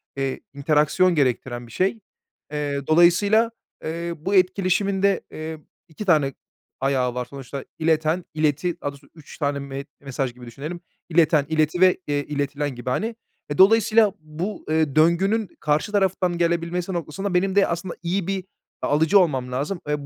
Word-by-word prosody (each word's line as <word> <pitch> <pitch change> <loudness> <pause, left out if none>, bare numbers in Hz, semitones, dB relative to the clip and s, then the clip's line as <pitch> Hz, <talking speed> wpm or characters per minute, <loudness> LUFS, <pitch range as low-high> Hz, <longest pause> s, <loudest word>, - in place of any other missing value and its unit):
eee, 135 -1 -2
interaction 155 +5 +2
gerektiren 125 -3 0
bir - - -15
şey. 195 - 0 0.5
Eee, 145 -2 -3
dolayısıyla, 200 +8 +4 0.3
eee, 170 +2 -3
bu 195 +6 -2
etkileşimin 190 +1 +2
de, 200 -2 +3
eee, 160 0 -6 0.3
2 175 +6 -8
tane 150 -7 +3 0.5
ayağı 130 -2 +1
var 125 0 -2
sonuçta. 135 +1 -8 0.2
İleten, 160 +2 +1
ileti, 155 +2 0
daha 145 - -1
doğrusu 140 0 -17
3 155 -3 -13
tane 145 -2 -1
me 140 0 -6 0.2
mesaj 135 -2 -3
gibi 125 0 -12
düşünelim. 150 +9 -7 0.3
İleten, 155 -3 +4
ileti 160 +3 +1
ve, 185 -1 +6
eee, 145 -1 +1
iletilen 145 -1 -2
gibi 120 +1 -5
hani. 225 - -1 0.3
Eee, 145 - -3
dolayısıyla 215 +1 +5
bu, 160 +7 -6
eee, 155 -3 +1
döngünün 190 +7 +3
karşı 150 +7 0
taraftan 190 -3 +1
gelebilmesi 170 +2 0
noktasında 175 +4 -3
benim 190 +2 +1
de 200 - +5
aslında 170 +1 -3
iyi 185 +1 -1
bir 195 -1 -2 0.4
a - - -1
alıcı 160 +7 +4
olmam 135 -8 +1
lazım. 145 +9 -2
Eee, 150 -1 -2
160 Hz, 160 wpm, -23 LUFS, 140-185 Hz, 0.5 s, ve